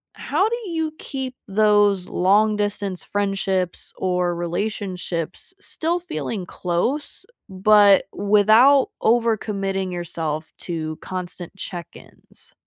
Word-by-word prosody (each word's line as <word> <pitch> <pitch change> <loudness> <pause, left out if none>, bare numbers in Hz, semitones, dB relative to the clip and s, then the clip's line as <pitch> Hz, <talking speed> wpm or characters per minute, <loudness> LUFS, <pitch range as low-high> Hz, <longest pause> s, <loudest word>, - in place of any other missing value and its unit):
how 395 - +1
do 465 -3 -4
you 320 -2 -1
keep 265 -2 -5
those 205 -2 +3
long-distance 205 0 +1
friendships 195 -3 -2
or 180 -1 0
relationships 180 - -4
still 340 -2 -2
feeling 275 - -4
close, 180 - -2 0.2
but 200 +1 +5
without 215 +7 +5
over-committing 205 -5 0
yourself 160 -3 -4
to 155 -3 -4
constant 180 -1 -6
check-ins? 175 -3 -10
200 Hz, 90 wpm, -22 LUFS, 180-220 Hz, 0.2 s, but